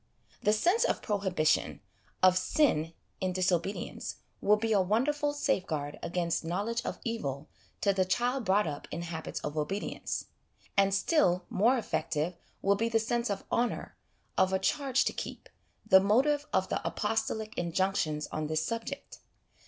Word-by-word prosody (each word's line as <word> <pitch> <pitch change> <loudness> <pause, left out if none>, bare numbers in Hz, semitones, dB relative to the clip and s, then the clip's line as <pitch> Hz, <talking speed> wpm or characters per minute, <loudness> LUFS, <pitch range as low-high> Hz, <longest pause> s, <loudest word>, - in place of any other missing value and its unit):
The 210 - +3
sense 350 - +3
of - - 0
prohibition, 190 -7 +1 0.4
of 185 -1 +7
sin 185 - +2 0.3
in 185 -1 -1
dis 185 +1 +2
obedience, 175 +3 -2 0.3
will 210 - +5
be 225 +1 -1
a 200 - +4
wonderful 285 +10 +1
safeguard 180 - -1
against 170 -1 -1
knowledge 205 +8 -1
of - - -4
evil 155 - -3 0.3
to 200 - +3
the 190 -1 +2
child 245 +7 0
brought 205 +1 +3
up 145 -3 -5
in 170 - -4
habits 165 -2 -5
of 150 0 -4
obedience; 155 +7 -3 0.5
and 195 0 +4
still 195 - +2
more 235 +7 +4
effective 165 -6 -1 0.3
will 200 - +4
be 230 +3 0
the 225 - +3
sense 235 +1 0
of 200 -1 -2
honour, 240 0 -1 0.4
of 190 - +4
a 190 - +3
charge 270 +6 +1
to - - 0
keep - - -6 0.4
the 190 - +8
motive 270 +9 +2
of - - +1
the - - -1
apostolic 220 -1 -1
injunctions 170 -3 0
on 155 0 -2
this 155 +1 0
subject. 230 - -5
195 Hz, 155 wpm, -30 LUFS, 175-230 Hz, 0.5 s, the